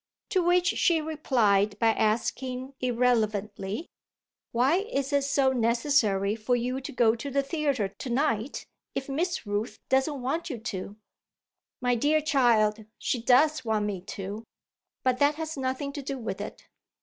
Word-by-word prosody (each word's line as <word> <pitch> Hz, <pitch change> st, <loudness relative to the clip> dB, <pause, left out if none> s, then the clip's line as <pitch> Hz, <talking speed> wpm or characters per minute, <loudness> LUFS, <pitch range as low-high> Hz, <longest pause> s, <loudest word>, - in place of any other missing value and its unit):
To 380 Hz, -4 st, +2 dB
which 355 Hz, +1 st, +3 dB
she 340 Hz, -3 st, +3 dB
replied 225 Hz, -10 st, +1 dB
by 225 Hz, +1 st, +3 dB
asking 250 Hz, +4 st, -1 dB
irrelevantly: 220 Hz, -, 0 dB, 0.6 s
"Why 260 Hz, +8 st, +3 dB
is 290 Hz, -, -2 dB
it 280 Hz, -1 st, +3 dB
so 275 Hz, -1 st, +3 dB
necessary 230 Hz, -4 st, +2 dB
for 230 Hz, +3 st, 0 dB
you 250 Hz, +2 st, -2 dB
to -, -, -6 dB
go 230 Hz, -3 st, +3 dB
to 235 Hz, +5 st, -5 dB
the 280 Hz, +1 st, +1 dB
theatre 275 Hz, -7 st, 0 dB
to 205 Hz, +6 st, -8 dB
night 240 Hz, -1 st, 0 dB, 0.3 s
if 270 Hz, -, -3 dB
Miss 330 Hz, +2 st, -2 dB
Rooth 205 Hz, +3 st, -2 dB
doesn't 265 Hz, +2 st, +2 dB
want 300 Hz, +8 st, -2 dB
you 260 Hz, -, -4 dB
to?" 205 Hz, -3 st, -5 dB, 0.9 s
"My 245 Hz, 0 st, +2 dB
dear 295 Hz, +6 st, +3 dB
child, 235 Hz, -8 st, +3 dB
she 245 Hz, -, -1 dB
does 280 Hz, +5 st, +4 dB
want 220 Hz, -2 st, 0 dB
me 200 Hz, -3 st, -3 dB, 0.2 s
to. 200 Hz, +3 st, -5 dB, 0.6 s
But 255 Hz, -1 st, +1 dB
that 285 Hz, +1 st, +4 dB
has 320 Hz, 0 st, -4 dB
nothing 265 Hz, +1 st, -3 dB
to 285 Hz, -, -5 dB
do 275 Hz, 0 st, -4 dB
with 205 Hz, -5 st, -4 dB
it." 210 Hz, -, -8 dB
250 Hz, 155 wpm, -27 LUFS, 220-285 Hz, 0.9 s, does